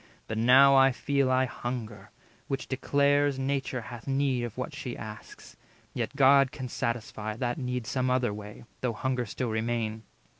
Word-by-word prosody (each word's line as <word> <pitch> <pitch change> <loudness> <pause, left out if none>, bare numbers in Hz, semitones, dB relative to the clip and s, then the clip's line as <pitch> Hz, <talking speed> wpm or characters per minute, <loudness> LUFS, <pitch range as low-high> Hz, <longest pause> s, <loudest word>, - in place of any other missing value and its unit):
But 110 - -3
now 135 +4 +7
I 135 0 +6
feel 140 +1 0
I 130 0 +3
hunger; 115 -5 -6 0.4
which 135 -2 -3
declares 140 +1 +2
Nature 135 -1 -2
hath 120 0 -10
need 135 -2 +1
of 120 - -8
what 130 +4 -4
she 130 -4 -6
asks. 110 0 -10 0.4
Yet - - -3
God 135 -1 +5
Can 130 -4 -6
satisfy 110 -2 -3
that 120 +2 -2
need 125 -2 -3
some 130 +1 -1
other 125 -4 +1
way, 105 0 -9 0.2
Though 125 -2 0
hunger 125 +1 -2
still 125 +3 -3
remain. 110 -1 -2
125 Hz, 160 wpm, -28 LUFS, 115-135 Hz, 0.4 s, now